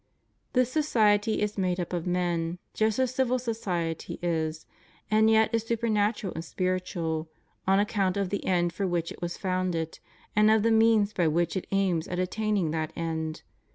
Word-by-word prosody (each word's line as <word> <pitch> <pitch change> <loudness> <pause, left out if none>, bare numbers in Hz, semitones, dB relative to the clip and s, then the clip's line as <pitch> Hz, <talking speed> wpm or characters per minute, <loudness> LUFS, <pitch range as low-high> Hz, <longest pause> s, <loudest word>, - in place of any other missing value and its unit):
'' - - -45
This 255 -1 +2
society 215 -8 +2
is 210 -1 -2
made 180 -1 0
up 175 0 -4
of 175 0 -2
men, 175 -1 0 0.2
just 220 -1 +1
as 260 -1 +1
civil 255 -1 +1
society 185 -9 -3
is, 160 -2 -1 0.5
and 220 +1 +5
yet 220 0 +4
is 230 - +2
supernatural 215 -3 0
and 165 - -5
spiritual, 170 -3 -2 0.4
on 195 +1 +4
account 200 -2 +1
of 195 -2 -1
the 200 - -2
end 175 -2 +1
for 195 +2 -1
which 170 -2 -1
it - - -11
was 175 0 -3
founded, 185 -4 -2 0.4
and 215 0 +5
of 220 -1 +4
the 230 - +3
means 220 -2 +4
by 175 -4 +2
which 170 +4 +1
it 190 - -3
aims 190 -4 +1
at 180 - -4
attaining 195 -2 0
that 160 -1 -2
end. 160 -1 -3
190 Hz, 180 wpm, -28 LUFS, 170-215 Hz, 0.5 s, and